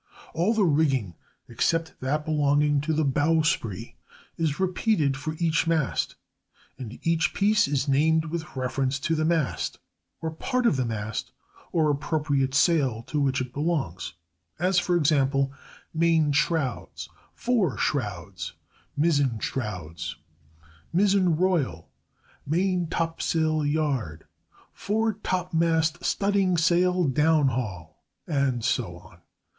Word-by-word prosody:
All 180 +8 +1
the 210 -3 +3
rigging, 140 - +1 0.3
except 165 +7 0
that 150 +4 -1
belonging 145 -1 +2
to 155 +2 -2
the 155 0 +1
bowsprit, 145 - 0 0.4
is 160 -2 -1
repeated 185 -6 +1
for 155 +3 -4
each 165 -1 +1
mast, 160 -5 0 0.6
and 120 -2 -7
each 165 0 +1
piece 210 -1 +3
is 140 0 0
named 160 +3 +3
with 160 -2 -5
reference 130 +1 -1
to 165 - 0
the 155 -1 +1
mast 160 -4 0 0.4
or 160 - -3
part 250 +10 -1
of 230 - +4
the 130 -1 0
mast 110 -1 -4 0.4
or 155 -3 +2
appropriate 145 -2 0
sail 135 -8 +2
to 150 +4 -3
which 135 -1 +1
it 125 0 -5
belongs: 145 - -2 0.4
as, 180 +2 +2
for 180 0 0
example, 140 -3 +2 0.4
main 160 -2 +3
shrouds, 145 -2 -1 0.3
fore 225 - +1
shrouds, 100 - -3 0.4
mizzen 145 -6 +2
shrouds, 90 -10 -4 0.8
mizzen 190 -2 +3
royal, 155 - 0 0.6
maintopsail 165 -3 0
yard, 135 - -2 0.5
foretopmast 180 -6 0
studdingsail 180 -4 +2
downhaul, 130 - +1 0.4
and 135 -6 0
so 110 -8 -1
on. 90 0 -17
155 Hz, 110 wpm, -26 LUFS, 135-170 Hz, 0.8 s, of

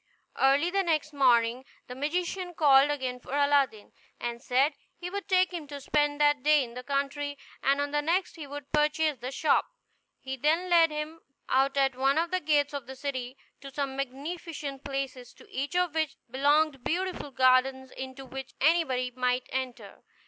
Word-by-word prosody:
Early 280 +6 +4
the 395 +1 +2
next 310 -4 0
morning, 245 -2 +3 0.2
the 250 - -8
magician 350 +6 -2
called 280 -2 +6
again 260 -4 -2
for 265 - -6
Aladdin, 285 -6 +2 0.3
and 235 0 -4
said 270 +4 +2 0.2
he 355 +1 -6
would 400 0 -5
take 370 -1 +3
him 325 -4 -5
to 285 0 -7
spend 295 +1 0
that 290 -2 +3
day 300 0 +4
in 235 -2 -9
the 250 - -6
country, 280 +2 -2 0.2
and 275 +1 +2
on 285 0 -1
the 295 0 +1
next 350 +5 0
he 310 -4 -8
would 285 0 -8
purchase 300 -1 +1
the 250 +2 -4
shop. 300 +3 +2 0.5
He 265 0 -6
then 325 +7 +1
led 335 -1 +6
him 305 +2 -5 0.3
out 270 +1 +2
at 270 -2 +2
one 270 +3 +2
of 335 +1 0
the 370 - +1
gates 295 -2 +1
of 280 -4 -5
the 265 - -8
city, 260 -1 -4 0.2
to 275 - -10
some 275 0 -3
magnificent 280 +1 -5
palaces, 270 -3 -5
to - - -17
each 280 +4 -3
of 360 -3 +1
which 315 -2 -1 0.2
belonged 285 +1 +2
beautiful 360 -3 -2
gardens, 260 0 +3
into 265 +1 -8
which 265 0 -8
anybody 270 -5 +2
might 250 0 -1
enter. 260 -2 -5
280 Hz, 180 wpm, -28 LUFS, 265-310 Hz, 0.5 s, called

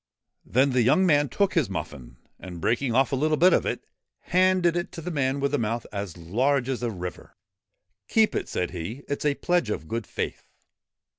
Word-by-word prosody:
Then 135 +3 +3
the 125 -1 +3
young 135 +11 +4
man 145 -4 +3
took 200 +9 +1
his 165 - +1
muffin, 70 -9 -6 0.2
and, 90 -2 -8
breaking 120 +6 0
off 135 +2 +3
a - - +1
little 155 +3 +1
bit 180 +4 +6
of - - +2
it, - - -3 0.4
handed 185 -1 +3
it 175 +1 -2
to 165 - -7
the 180 - -4
man 140 -3 0
with 140 0 0
the 145 - +1
mouth 115 +1 -2
as 100 -4 -5
large 125 +10 0
as 130 -2 -2
a 120 - -1
river. 90 -4 -7 0.3
' - - -50 0.3
Keep 220 -1 +3
it,' - - -3
said 90 - -2
he; 95 - -6
' - - -34
it 145 - -3
's - - -4
a 145 -1 +2
pledge 175 -9 0
of 80 -6 -3
good 115 +1 -4
faith.' - - -4
130 Hz, 220 wpm, -26 LUFS, 105-155 Hz, 0.4 s, bit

